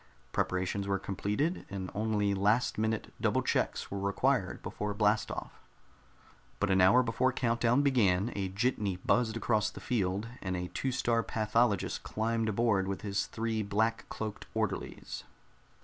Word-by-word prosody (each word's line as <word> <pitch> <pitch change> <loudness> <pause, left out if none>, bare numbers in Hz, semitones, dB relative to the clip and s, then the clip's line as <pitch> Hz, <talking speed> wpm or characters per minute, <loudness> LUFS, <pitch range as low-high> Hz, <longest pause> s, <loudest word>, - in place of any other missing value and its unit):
Preparations 95 +2 -1
were 100 0 +1
completed, 105 - -2
and 95 -2 -5
only 105 -1 +1
last 105 +5 +2
minute 110 0 -1
double - - +2
checks - - 0
were 100 - -3
required 100 0 0
before 105 -1 -3
blast 105 +1 +2
off. - - -7 1.0
But 105 -1 +1
an 95 0 +4
hour 100 +8 +6
before 125 +3 +1
count 120 -2 0
down 120 +4 +3
began, 110 -6 +3
a 95 -2 -1
jitney 100 -1 0
buzzed 110 +4 +1
across 110 -2 +1
the - - -10
field, 100 -3 -1
and 95 -1 -2
a 90 0 -4
Two 135 - -1
star 120 -2 +1
Pathologist 110 -2 +1
climbed 115 0 -1
aboard 105 -3 +2
with 95 -1 -3
his 100 -1 -1
three 110 -1 -2
black 110 +3 0
cloaked 110 -2 -5
orderlies. - - -3
105 Hz, 150 wpm, -31 LUFS, 100-115 Hz, 1.0 s, hour